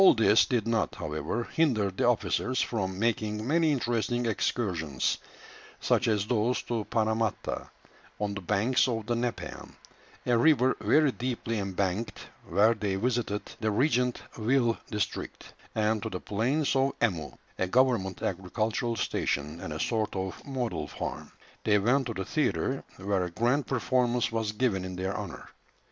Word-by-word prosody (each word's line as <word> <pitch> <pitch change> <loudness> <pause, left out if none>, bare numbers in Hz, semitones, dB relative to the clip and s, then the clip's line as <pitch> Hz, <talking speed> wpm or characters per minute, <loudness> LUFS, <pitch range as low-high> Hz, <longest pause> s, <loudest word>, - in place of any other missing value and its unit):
All 190 - +8
this 110 -1 +5
did 120 -5 0
not, 115 -1 +1
however, 75 +10 -3
hinder 120 -10 +1
the 95 - 0
officers 125 +2 +1
from 95 -5 -1
making 110 0 0
many 160 +2 +3
interesting 120 -2 0
excursions, 90 - 0 0.6
such - - +2
as 105 -3 +2
those 120 +2 +1
to 115 -3 -2
Paramatta, 110 -1 -1 0.5
on 105 -1 -1
the 100 - -5
banks 105 +8 +2
of 115 -3 -2
the 120 - 0
Nepean, 120 0 -4 0.5
a 120 - +3
river 130 -1 +4
very 150 -2 +4
deeply 120 -2 -2
embanked, 100 +2 -2 0.2
where 110 +3 +4
they 105 -3 -2
visited 115 -1 0 0.2
the 110 - 0
Regent 125 +2 +1 0.2
Ville 120 0 +3
district; 105 -2 -4 0.2
and 110 0 +1
to - - -3
the 90 - -4
"plains 130 - 0
of 135 +1 +2
Emu," 85 -11 0 0.3
a 95 - +1
government 115 -4 +2
agricultural 110 +6 -1
station, 75 -6 -1
and 95 - -5
a 75 - -4
sort 110 0 0
of 95 0 -4
model 120 - -3
farm. - - -5 0.3
They 105 -1 +4
went 125 +6 +2
to 115 - -4
the 95 - -3
theatre, 135 -3 0
where 95 -1 0
a - - -4
grand 120 +10 +1
performance 125 -2 +1
was 110 -2 -1
given 105 -4 0
in 95 0 -5
their 95 +1 -2
honour. 100 -5 -6
110 Hz, 155 wpm, -29 LUFS, 100-125 Hz, 0.6 s, All